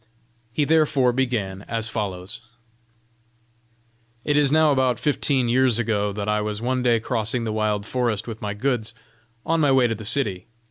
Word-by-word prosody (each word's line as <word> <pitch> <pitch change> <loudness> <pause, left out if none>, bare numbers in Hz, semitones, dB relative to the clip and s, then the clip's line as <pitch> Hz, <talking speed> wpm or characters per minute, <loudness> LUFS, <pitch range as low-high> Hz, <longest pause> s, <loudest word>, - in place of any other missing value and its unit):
He 145 +5 0
therefore 140 -5 +3
began 115 -7 -2
as 115 -1 -3
follows: 100 -4 -5 1.8
"It 145 - +1
is 145 -2 +3
now 155 0 +4
about 130 -4 +1
fifteen 140 -3 +1
years 125 -1 +2
ago 105 -3 0
that 100 0 -5
I 105 0 +1
was 105 0 -3
one 125 +2 -1
day 120 -2 +2
crossing 115 0 -1
the 110 -1 -3
wild 105 -1 -1
forest 120 -3 -2
with 110 -2 -7
my 105 0 -4
goods, 120 -1 -2 0.5
on 165 0 +1
my 145 -2 +3
way 130 -2 +4
to 115 - +1
the 110 0 -8
city. 105 -5 +1
115 Hz, 170 wpm, -23 LUFS, 105-130 Hz, 1.8 s, now